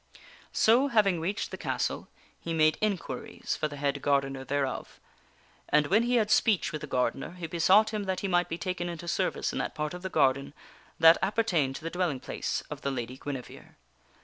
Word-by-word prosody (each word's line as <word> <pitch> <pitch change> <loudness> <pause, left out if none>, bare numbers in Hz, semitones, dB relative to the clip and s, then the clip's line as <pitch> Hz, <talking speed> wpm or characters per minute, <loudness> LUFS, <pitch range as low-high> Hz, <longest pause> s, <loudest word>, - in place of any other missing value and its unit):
So, 240 +5 +4
having 205 -9 +3
reached 195 +5 -2
the - - -7
castle, - - -2 0.3
he 165 -1 -4
made 155 -1 +3
inquiries 205 -4 -3
for 155 - -1
the 145 - -8
head 140 0 -1
gardener 135 -1 0
thereof; 135 0 -3 0.7
and 150 0 +4
when 200 +9 +3
he 245 +1 +1
had 215 -3 +2
speech 200 -7 +3
with 155 -2 -5
the - - -6
gardener 125 +5 -1
he 180 -2 -6
besought 185 +7 +4
him 210 -1 -2
that 190 -1 -2
he 200 - -1
might 175 -1 +1
be 165 - -3
taken 175 -2 -3
into 170 0 -7
service 170 - -1
into - - -1
that - - -4
part 150 +1 -3
of 180 - -7
the 190 - -4
garden 140 -2 +1 0.4
that 165 +1 +7
appertained 185 -10 +1
to - - -8
the 165 - -4
dwelling 175 -7 -1
place - - -3
of - - -6
the 140 - -1
Lady 125 -2 -4
Guinevere. 135 -4 -7
165 Hz, 200 wpm, -29 LUFS, 145-190 Hz, 0.7 s, that